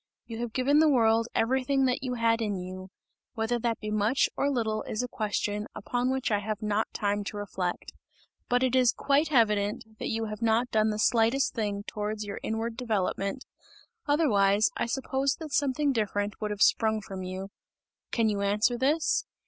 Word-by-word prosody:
You 225 -1 -7
have 240 -1 -3
given 275 +5 +3
the 315 0 +5
world 230 -3 +3
everything 265 +3 +2
that 255 +1 0
you 255 -2 -3
had 230 -1 +2
in 210 -2 -1
you; 185 +1 -7 0.5
whether 230 +1 0
that 230 -1 -1
be 215 -1 -5
much 215 +5 +2
or 280 - +1
little 220 -5 -1
is 215 - -2
a - - -2
question, 210 -2 -2
upon 245 +4 -1
which 260 -2 -1
I 205 - +2
have 210 0 -4
not 215 0 -1
time 205 0 -1
to 205 - -5
reflect. 185 -3 -4 0.6
But 245 +1 +2
it 260 0 +2
is 250 -2 +4
quite 290 +2 +1
evident, 215 -2 +1
that - - -3
you 225 0 -1
have 215 0 -6
not 230 +2 +2
done 215 0 +3
the 210 - -2
slightest 230 +4 +2
thing 205 -3 -2
towards 210 0 -4
your 200 - -5
inward 225 +1 -3
developement; 215 0 -2 0.6
otherwise 215 -9 +3
I - - -1
suppose 270 +2 0
that 315 -4 -8
something 285 +1 +1
different 210 -3 -2
would 210 - -1
have 205 -1 +1
sprung 220 -1 +3
from 195 -2 -7
you. 185 +1 -5 0.6
Can 230 -2 +2
you 205 -2 0
answer 210 +4 +1
this? 295 +4 +1
225 Hz, 185 wpm, -28 LUFS, 210-250 Hz, 0.6 s, the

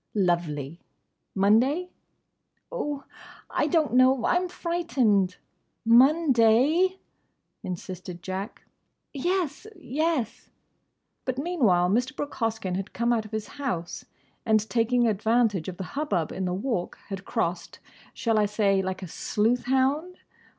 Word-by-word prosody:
"Lovely!—Monday?" 195 - 0 0.8
"Oh, 295 - -3 0.5
I 295 - +1
don't 310 -4 +1
know. 255 -1 +4
I'm 360 0 +1
frightened." 265 - +1 0.5
"Monday?" 270 +6 +4 0.7
insisted 180 -1 -7
Jack. 190 +3 -5 0.5
"Yes! 350 +5 -1
Yes!" 295 - -2 0.7
But 255 -1 -3
meanwhile 255 - +2
Mr. 245 +7 0
Brooke 290 - -4
Hoskyn 220 -5 -2
had 195 +2 -5
come 235 +1 +1
out 225 -2 0
of 215 - -12
his 220 -1 -3
house, 175 -11 -3 0.4
and 220 -1 +2
taking 240 +1 +2
advantage 220 -3 +1
of 180 -2 -6
the 190 - -4
hubbub 280 - -1
in 190 - -3
the 180 - -1
Walk 200 -4 -2
had 195 -1 -5
crossed—shall 215 +6 -3
I 210 - +3
say 200 -2 +2
like 190 0 -4
a - - -5
sleuth 220 +8 0
hound? 275 +8 +1
230 Hz, 115 wpm, -26 LUFS, 190-280 Hz, 0.8 s, know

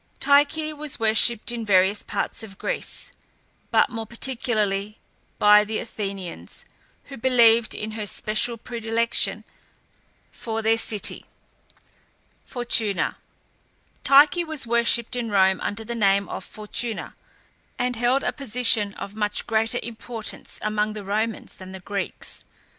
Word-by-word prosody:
Tyche 295 +2 +3
was 300 -1 -4
worshipped 225 +1 +3
in 235 -1 -4
various 200 0 +3
parts - - -3
of 200 -3 -9
Greece, - - -4 0.6
but - - +3
more 225 -2 -5
particularly 215 -4 -2 0.4
by 210 0 +7
the 215 +1 -3
Athenians, 195 -5 -6 0.4
who 275 - -10
believed 235 -2 +4
in 215 +1 -4
her 215 -1 -4
special 215 +4 +1
predilection 230 0 -1 0.9
for 225 -1 -4
their 225 +1 +3
city. 210 -2 0 1.2
FORTUNA. 235 -5 0 0.9
Tyche 290 +5 +6
was 315 -5 -3
worshipped 235 +1 +2
in 240 -2 -2
Rome 190 -2 +3
under 205 +2 -3
the 235 +2 -5
name 200 -3 +2
of - - -5
Fortuna, 215 +2 -4 0.6
and 245 0 -1
held 245 +4 +1
a - - 0
position 230 -5 +1
of 200 - -7
much 210 -1 -2
greater 225 +1 +1
importance 230 -1 -5
among 215 0 0
the 210 -1 -7
Romans 215 +2 -2
than 185 0 -11
the 190 - -7
Greeks. 200 +1 -5
225 Hz, 125 wpm, -24 LUFS, 210-240 Hz, 1.2 s, by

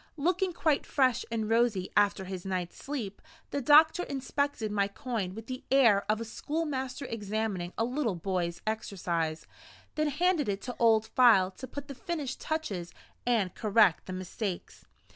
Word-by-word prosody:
Looking 360 +5 +1
quite 315 -4 +1
fresh 260 -4 +2
and 225 -2 -2
rosy 225 -4 +1
after 205 -2 +3
his 185 -1 -6
night's 185 -2 -3
sleep, 240 -9 -5 0.3
the 285 - -1
doctor 310 +5 +6
inspected 275 -5 -2
my 200 -1 +1
coin 200 -3 -4
with 225 0 -8
the 255 +2 -6
air 230 -7 +4
of 215 - 0
a 230 - -4
schoolmaster 280 +1 -3
examining 210 -5 -3
a 225 - +2
little 245 -5 -1
boy's 175 -1 -2
exercise; 170 -7 -2 0.5
then 305 0 0
handed 315 - +1
it 195 -1 -1
to 245 - -5
Old 225 -2 +4
File 220 -7 +5
to 260 +7 -9
put 285 +3 -7
the 275 - -6
finished 295 -3 -4
touches 200 - -3 0.4
and 215 -7 +2
correct 210 -5 +3
the 185 - -5
mistakes. 185 +1 -5
225 Hz, 160 wpm, -30 LUFS, 195-275 Hz, 0.5 s, doctor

